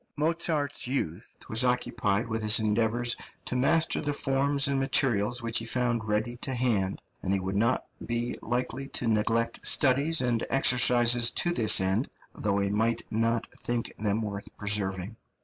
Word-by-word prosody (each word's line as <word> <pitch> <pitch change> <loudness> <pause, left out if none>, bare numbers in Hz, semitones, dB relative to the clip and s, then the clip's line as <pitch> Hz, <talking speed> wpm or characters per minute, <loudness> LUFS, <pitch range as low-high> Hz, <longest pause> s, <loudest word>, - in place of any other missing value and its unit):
Mozart's 155 -3 -1
youth 110 - -4
was 110 +3 +2
occupied 120 -4 -1
with 110 0 -3
his 110 +2 +5
endeavours 115 +2 0 0.3
to - - -3
master 155 +6 +2
the 145 -1 -2
forms 140 +1 +1
and 140 -1 0
materials 120 -4 0
which 115 0 +1
he 115 - -6
found 120 -1 -1
ready 110 +3 -2
to 130 +1 -3
hand, 110 -6 0 0.2
and 95 - -2
he 100 - 0
would 95 +1 -4
not 115 +5 0 0.2
be 120 +1 -3
likely 125 +3 -3
to 125 - -3
neglect 115 +1 0
studies 140 +4 +3
and 120 -3 0
exercises 120 -2 +4
to 175 +9 -1
this 110 -8 +6
end, 95 +7 +1 0.2
though 100 -2 -2
he 100 0 -1
might 115 +2 0
not 115 +1 0 0.2
think 120 -1 -3
them 105 +1 -1
worth 100 -1 -6
preserving. 100 0 -1
115 Hz, 160 wpm, -27 LUFS, 105-130 Hz, 0.3 s, this